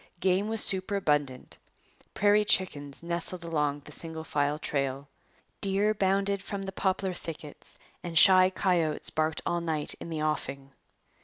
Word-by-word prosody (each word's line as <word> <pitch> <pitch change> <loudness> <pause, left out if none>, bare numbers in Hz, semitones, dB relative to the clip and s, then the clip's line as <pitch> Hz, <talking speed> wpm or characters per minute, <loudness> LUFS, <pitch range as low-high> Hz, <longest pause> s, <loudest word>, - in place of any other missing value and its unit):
Game 190 +3 +2
was 225 -1 0
superabundant. 155 -9 0 0.6
Prairie 205 +1 +4
chickens 150 -9 0
nestled 170 +1 -2
along 150 -3 -1
the 150 - -13
single 160 +1 -7
file 145 -1 0
trail. 140 -2 -2 0.5
Deer 200 +2 +1
bounded 195 -1 +1
from 200 0 -5
the 190 - -5
poplar 190 0 -1
thickets 155 -3 -5 0.2
and 170 -2 -4
shy 185 0 +8
coyotes 175 -4 +2
barked 155 0 0
all 175 0 0
night 160 -3 0
in - - -8
the 155 -2 -3
offing. 140 -3 -3
170 Hz, 140 wpm, -28 LUFS, 150-190 Hz, 0.6 s, shy